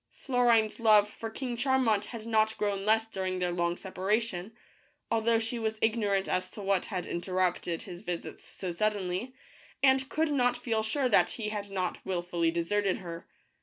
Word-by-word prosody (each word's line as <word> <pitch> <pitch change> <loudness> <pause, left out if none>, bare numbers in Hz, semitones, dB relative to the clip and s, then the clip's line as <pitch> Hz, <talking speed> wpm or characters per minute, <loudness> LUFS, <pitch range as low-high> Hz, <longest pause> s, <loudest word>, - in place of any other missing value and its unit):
Florine's 240 -4 +2
love 215 -2 +6
for 225 +2 -7
King 245 +2 -4
Charmant 240 -5 +2
had 230 -2 -8
not 220 -1 +2
grown 200 -1 -1
less 220 +1 +4
dur 195 -4 -5
ing 185 0 -1
their 180 -1 0
long 175 0 0
separation, 195 0 -1 0.6
although 230 0 +3
she 230 +1 -2
was 220 -1 -1
ignorant 210 -4 +1
as 185 0 0
to - - -11
what 195 -2 +1
had 185 -4 -4
interrupted 180 -1 -1
his 175 0 -9
visits 175 -5 -5
so 185 -2 -6
suddenly, 205 +4 -1 0.5
and 265 -1 +4
could 315 0 0
not 245 -3 +2
feel 230 -3 -1
sure 255 +5 0
that 225 - +4
he 215 -3 -3
had 205 -1 -4
not 185 -2 -3
willfully 175 -2 0
deserted 185 +4 0
her. 170 -2 -8
210 Hz, 170 wpm, -30 LUFS, 185-230 Hz, 0.6 s, love